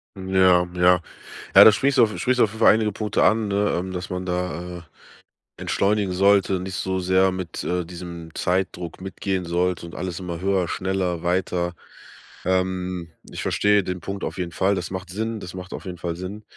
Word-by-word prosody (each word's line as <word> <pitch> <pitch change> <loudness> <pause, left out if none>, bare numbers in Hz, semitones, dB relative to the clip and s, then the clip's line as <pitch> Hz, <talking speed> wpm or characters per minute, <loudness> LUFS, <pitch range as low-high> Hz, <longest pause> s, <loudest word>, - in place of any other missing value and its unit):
Mhm, 95 0 -5
ja, 90 -1 +5
ja. 90 0 +4 0.5
Ja, - - +12
da 110 - +9
sprichst 135 +6 +1
du 120 - +7
auf 105 -1 0
sprichst 125 0 +1
du - - +7
auf 105 - +1
jeden 110 - -10
Fall 110 - +7
einige 110 -1 +1
Punkte 105 0 0
an, 110 -1 +3
ne? 100 +1 +1
Ähm, 95 +2 -3
dass 90 +1 -5
man 90 0 -4
da, 90 -1 -3
äh, - - -12 0.8
Entschleunigen 100 -1 0
sollte, 95 0 +3
nicht 95 +1 -6
so 95 0 -1
sehr 95 +1 +3
mit, 95 -2 -5
äh, 90 -1 -1
diesem 85 -2 -9
Zeitdruck 90 -2 -2
mitgehen 95 -1 -3
sollte 90 0 -1
und 85 - -9
alles 90 -1 -4
immer 85 -2 -5
höher, 95 -2 +1
schneller, 95 -2 -2
weiter. 90 0 0 0.7
Ähm, 90 -2 -1 0.2
Ich - - -5
verstehe 105 -1 +2
den 90 0 -4
Punkt 95 +2 -6
auf - - -4
jeden 90 -2 -3
Fall. 95 +3 +1
Das 90 0 -4
macht 95 -1 -5
Sinn, 110 +3 -3
das 90 -2 -8
macht 95 0 -8
auf - - -7
jeden 90 -1 -6
Fall 85 0 -4
Sinn. 95 +4 -7
95 Hz, 205 wpm, -23 LUFS, 90-100 Hz, 0.8 s, Ja